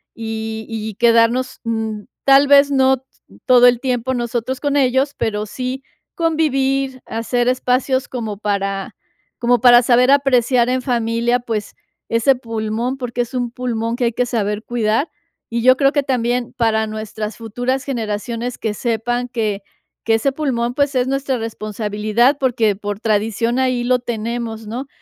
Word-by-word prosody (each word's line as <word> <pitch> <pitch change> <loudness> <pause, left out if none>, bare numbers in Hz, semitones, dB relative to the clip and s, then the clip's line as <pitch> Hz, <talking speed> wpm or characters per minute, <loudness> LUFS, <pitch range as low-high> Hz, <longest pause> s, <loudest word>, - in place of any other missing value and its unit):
y 220 -1 -5
y 220 -2 -5
quedarnos, 235 +3 +2
mm, 220 -2 -3 0.2
tal 275 +1 +6
vez 285 0 +6
no 265 -1 +3 0.4
todo 245 -1 +7
el 245 -1 +3
tiempo 255 -1 -1
nosotros 240 +1 -3
con 290 -1 0
ellos, 265 +1 +2
pero 210 -1 -1
sí 255 +4 -5 0.3
convivir, 275 -5 0
hacer 240 +2 -1
espacios 255 +1 0
como 225 -5 -5
para 195 -2 -2 0.4
como 245 0 +2
para 240 -1 +8
saber 250 +2 +4
apreciar 255 -3 +3
en 255 0 0
familia, 235 -1 0
pues, 225 -4 -4 0.3
ese 230 +4 +3
pulmón, 230 +1 -3
porque 245 -2 -3
es 240 - -5
un 245 -2 -2
pulmón 235 -2 -2
que 245 - 0
hay 235 - 0
que 250 - 0
saber 210 -3 -2
cuidar. 235 +5 0 0.4
Y 235 0 -2
yo 255 +2 +6
creo 275 -1 +3
que 285 -1 +1
también 245 -2 -1
para 220 -2 +1
nuestras 215 0 -5
futuras 245 +4 -2
generaciones, 230 -1 -3
que 220 - -2
sepan 240 +2 -2
que 215 -4 -2 0.4
que 225 - +2
ese 250 +5 +1
pulmón, 255 -5 -1
pues, 285 +1 0
es 250 -1 +2
nuestra 275 -1 -1
responsabilidad, 215 +3 0
porque 230 -6 +1
por 205 0 -5
tradición 225 +3 0
ahí 255 -2 +1
lo 250 +1 +2
tenemos, 230 -1 -4
¿no? 245 +6 -5
240 Hz, 155 wpm, -19 LUFS, 225-255 Hz, 0.4 s, para